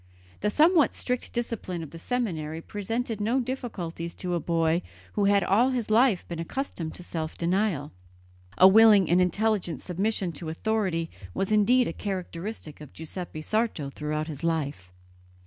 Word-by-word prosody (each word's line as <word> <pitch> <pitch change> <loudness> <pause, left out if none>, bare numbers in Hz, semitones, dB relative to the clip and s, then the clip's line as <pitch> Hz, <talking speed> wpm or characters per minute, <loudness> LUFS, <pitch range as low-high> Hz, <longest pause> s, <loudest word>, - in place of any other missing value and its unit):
The 210 - +1
somewhat 310 - +4
strict 250 -1 -2
discipline 225 -8 -3
of 155 - -9
the 165 - -9
seminary 165 -9 -2
presented 220 +4 -3
no 230 +5 +2
difficulties 195 -10 -4
to 180 -1 -3
a 170 - +1
boy 165 +1 +1 0.3
who 205 - +1
had 200 -1 +4
all 225 +9 +4
his 245 -4 -2
life 225 -3 +4
been 170 -1 -5
accustomed 165 - -4
to 180 - -9
self 160 -2 -4
denial; 175 -4 0 0.7
a 185 - +9
willing 210 -2 +7
and 180 +1 +5
intelligent 180 - 0
submission 190 0 -1
to 160 +1 -6
authority 180 -2 -1 0.2
was 195 - -1
indeed 240 +4 +4
a - - -3
characteristic 185 -4 -5
of 150 - -11
Giuseppe 160 -1 -6
Sarto 215 -9 -1
throughout 150 +1 -3
his 155 -2 -7
life. 145 - -2
185 Hz, 155 wpm, -27 LUFS, 165-220 Hz, 0.7 s, a